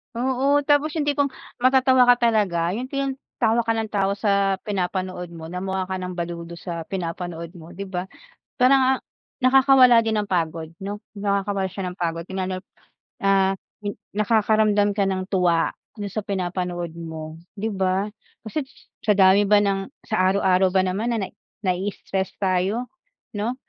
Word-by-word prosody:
Oo. 265 Hz, +4 st, +2 dB
Tapos, 295 Hz, +2 st, +2 dB
yung 305 Hz, -, +1 dB
tipong 285 Hz, -1 st, +2 dB, 0.3 s
matatawa 260 Hz, 0 st, +5 dB
ka 245 Hz, -, +8 dB, 0.2 s
talaga. 175 Hz, -6 st, +1 dB
Yung 245 Hz, +6 st, -3 dB
tin 275 Hz, -1 st, -2 dB, 0.2 s
tawa 230 Hz, 0 st, +2 dB
ka 225 Hz, -, +2 dB
ng 220 Hz, -1 st, -3 dB
tawa 200 Hz, -1 st, +1 dB
sa 200 Hz, -2 st, +2 dB
pinapanood 185 Hz, -2 st, -2 dB
mo, 160 Hz, 0 st, -8 dB
na 180 Hz, -, -3 dB
mukha 190 Hz, 0 st, -2 dB
ka 185 Hz, 0 st, -4 dB
ng 180 Hz, -1 st, -5 dB
baliw 170 Hz, -1 st, -4 dB
dun 170 Hz, -, -8 dB
sa 170 Hz, -1 st, -6 dB
pinapanood 170 Hz, -2 st, -4 dB
mo, 175 Hz, -1 st, -12 dB
di 195 Hz, -, -5 dB
ba? 190 Hz, -1 st, -4 dB, 0.5 s
Parang 265 Hz, 0 st, +5 dB
ang -, -, -14 dB, 0.4 s
nakakawala 260 Hz, -2 st, +7 dB
din 220 Hz, -1 st, +1 dB
ng 210 Hz, -, 0 dB
pagod, 165 Hz, -2 st, -1 dB
no? 205 Hz, +2 st, -6 dB, 0.2 s
Nakakawala 200 Hz, -1 st, 0 dB
siya 195 Hz, 0 st, -4 dB
ng 180 Hz, -, -13 dB
pagod 165 Hz, -1 st, -1 dB
yun 190 Hz, -, -3 dB
nga, 185 Hz, 0 st, -2 dB, 0.7 s
ah, 195 Hz, -1 st, +4 dB, 0.3 s
yung 205 Hz, -, -1 dB, 0.2 s
nakakaramdam 215 Hz, -1 st, +3 dB
ka 200 Hz, -, +3 dB
ng 185 Hz, -1 st, -2 dB
tuwa 175 Hz, -4 st, +2 dB, 0.3 s
dun 205 Hz, -, -3 dB
sa 215 Hz, -, -3 dB
pinapanood 180 Hz, -3 st, -3 dB
mo, 160 Hz, -1 st, -7 dB, 0.2 s
di 220 Hz, +3 st, -2 dB
ba? 190 Hz, 0 st, 0 dB, 0.4 s
Kasi 275 Hz, +7 st, -3 dB, 0.4 s
sa 210 Hz, -, +4 dB
dami 195 Hz, +1 st, +6 dB
ba 205 Hz, 0 st, +5 dB
ng 195 Hz, -1 st, 0 dB, 0.2 s
sa 215 Hz, -, 0 dB, 0.2 s
araw-araw 190 Hz, -1 st, +3 dB
ba 190 Hz, -, +4 dB
naman 210 Hz, +6 st, -1 dB
na 210 Hz, -4 st, -1 dB, 0.4 s
nai-stress 190 Hz, +1 st, -2 dB
tayo, 195 Hz, +6 st, 0 dB, 0.5 s
'no? 225 Hz, +5 st, -1 dB
195 Hz, 165 wpm, -23 LUFS, 180-225 Hz, 0.7 s, ka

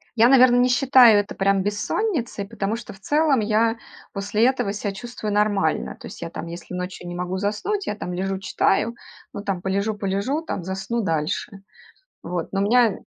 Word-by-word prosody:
я, 235 Hz, +2 st, +5 dB
наверно, 255 Hz, -2 st, +6 dB
не 250 Hz, +1 st, +4 dB
считаю 250 Hz, -4 st, +6 dB
это 205 Hz, -, -4 dB
прям 195 Hz, 0 st, +2 dB
бессонницей, 225 Hz, -, -2 dB
потому 215 Hz, 0 st, -3 dB
что 235 Hz, -, -9 dB
в 195 Hz, -, -17 dB
целом 295 Hz, -2 st, +2 dB
я 225 Hz, +2 st, +1 dB, 0.4 s
после 205 Hz, +3 st, +1 dB
этого 260 Hz, -6 st, 0 dB
себя 205 Hz, -1 st, -3 dB
чувствую 215 Hz, 0 st, -5 dB
нормально. 205 Hz, -6 st, +1 dB
То -, -, -9 dB
есть -, -, -11 dB
я, 170 Hz, -, -4 dB
там, 165 Hz, -, -7 dB
если 170 Hz, +2 st, -9 dB
ночью 180 Hz, 0 st, -5 dB
не 175 Hz, -, -6 dB
могу 180 Hz, +1 st, -3 dB
заснуть, 215 Hz, -, -2 dB
я, 210 Hz, -, -2 dB
там, 180 Hz, -3 st, -5 dB
лежу 190 Hz, +1 st, -2 dB
читаю, 210 Hz, +4 st, +1 dB, 0.4 s
ну, 200 Hz, -, -6 dB
там, 195 Hz, -3 st, -2 dB
полежу, 200 Hz, +3 st, -1 dB
полежу, 200 Hz, +9 st, -1 dB
там, 200 Hz, -, -5 dB
засну 190 Hz, +6 st, -3 dB
дальше. 165 Hz, +3 st, -2 dB, 0.6 s
Вот, 175 Hz, -1 st, -4 dB
но 195 Hz, -, -1 dB
у -, -, +2 dB
меня 235 Hz, -2 st, +4 dB
205 Hz, 190 wpm, -23 LUFS, 190-235 Hz, 0.6 s, наверно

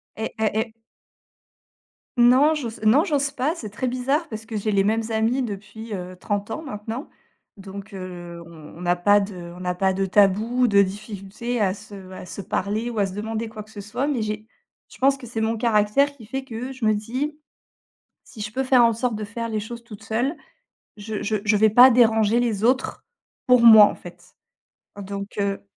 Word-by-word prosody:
Eh 220 Hz, -, -3 dB
eh 220 Hz, -, 0 dB
eh 220 Hz, -1 st, -3 dB, 1.4 s
Non 255 Hz, +6 st, +6 dB
j'ose 240 Hz, -7 st, -5 dB
non 255 Hz, +9 st, +5 dB
j'ose 285 Hz, -2 st, 0 dB
pas, 290 Hz, +5 st, -1 dB
c'est 215 Hz, -10 st, -8 dB
très 255 Hz, +4 st, -3 dB
bizarre 270 Hz, +6 st, 0 dB
parce 220 Hz, 0 st, -7 dB
que 225 Hz, -, -7 dB
j'ai 215 Hz, +1 st, -1 dB
les 195 Hz, -1 st, +3 dB
mêmes 220 Hz, +2 st, +1 dB
amis 225 Hz, +4 st, +1 dB
depuis, 220 Hz, -1 st, -6 dB
heu, 180 Hz, 0 st, -7 dB
30 205 Hz, +2 st, -3 dB
ans 315 Hz, -, -4 dB
maintenant. 230 Hz, -1 st, -6 dB, 0.5 s
Donc 200 Hz, +1 st, -9 dB
heu, 175 Hz, -2 st, -8 dB
on 165 Hz, 0 st, -13 dB
n'a 175 Hz, 0 st, +2 dB
pas 205 Hz, +4 st, +4 dB
de 200 Hz, 0 st, -4 dB, 0.2 s
on -, -, -11 dB
n'a 180 Hz, 0 st, -2 dB
pas 190 Hz, +1 st, +1 dB
de 195 Hz, +1 st, 0 dB
tabou, 210 Hz, +6 st, +3 dB
de 200 Hz, -1 st, +5 dB
difficulté 210 Hz, +4 st, -5 dB
à 195 Hz, -3 st, +2 dB
se 200 Hz, -2 st, -11 dB
à 185 Hz, -1 st, -9 dB
se 200 Hz, -, -7 dB
parler 210 Hz, +4 st, -2 dB
ou 225 Hz, -, -3 dB
à 200 Hz, -, +2 dB
se 185 Hz, -, -8 dB
demander 220 Hz, +1 st, -4 dB
quoi 215 Hz, -1 st, -8 dB
que 215 Hz, -, -19 dB
ce 205 Hz, -2 st, -8 dB
soit, 210 Hz, +7 st, -3 dB
mais 285 Hz, -5 st, -1 dB
j'ai 215 Hz, 0 st, -4 dB, 0.5 s
je -, -, -15 dB
pense 275 Hz, +1 st, +3 dB
que 260 Hz, -, -11 dB
c'est 225 Hz, -1 st, -4 dB
mon 225 Hz, +1 st, 0 dB
caractère 230 Hz, +5 st, +2 dB
qui 225 Hz, -5 st, -14 dB
fait 265 Hz, +4 st, -4 dB
que, 260 Hz, -, -12 dB, 0.2 s
heu, -, -, -6 dB
je 260 Hz, -3 st, -4 dB
me 215 Hz, -, +4 dB
dis: 255 Hz, +8 st, -3 dB, 0.9 s
«Si 220 Hz, -, -11 dB
je 210 Hz, 0 st, -4 dB
peux 265 Hz, +4 st, -1 dB
faire 255 Hz, -2 st, +5 dB
en 230 Hz, 0 st, +4 dB
sorte 235 Hz, +1 st, -1 dB
de 215 Hz, -, -5 dB
faire 230 Hz, +2 st, -5 dB
les 215 Hz, -1 st, -1 dB
choses 235 Hz, +3 st, -8 dB
toute 215 Hz, -3 st, -12 dB
seule, 245 Hz, +8 st, -1 dB, 0.6 s
je 210 Hz, 0 st, -5 dB
je 215 Hz, +1 st, 0 dB
je 210 Hz, -1 st, +3 dB
vais 220 Hz, +1 st, +5 dB
pas 245 Hz, +5 st, +8 dB
déranger 225 Hz, -2 st, +4 dB
les 225 Hz, -4 st, -1 dB
autres 255 Hz, +2 st, +1 dB, 0.4 s
pour 250 Hz, -1 st, +6 dB
moi, 220 Hz, -2 st, +10 dB
en -, -, -1 dB
fait», 175 Hz, +1 st, -14 dB, 0.6 s
hein. -, -, -6 dB
Donc 200 Hz, +1 st, -7 dB
heu 200 Hz, 0 st, -2 dB
220 Hz, 210 wpm, -23 LUFS, 200-240 Hz, 1.4 s, moi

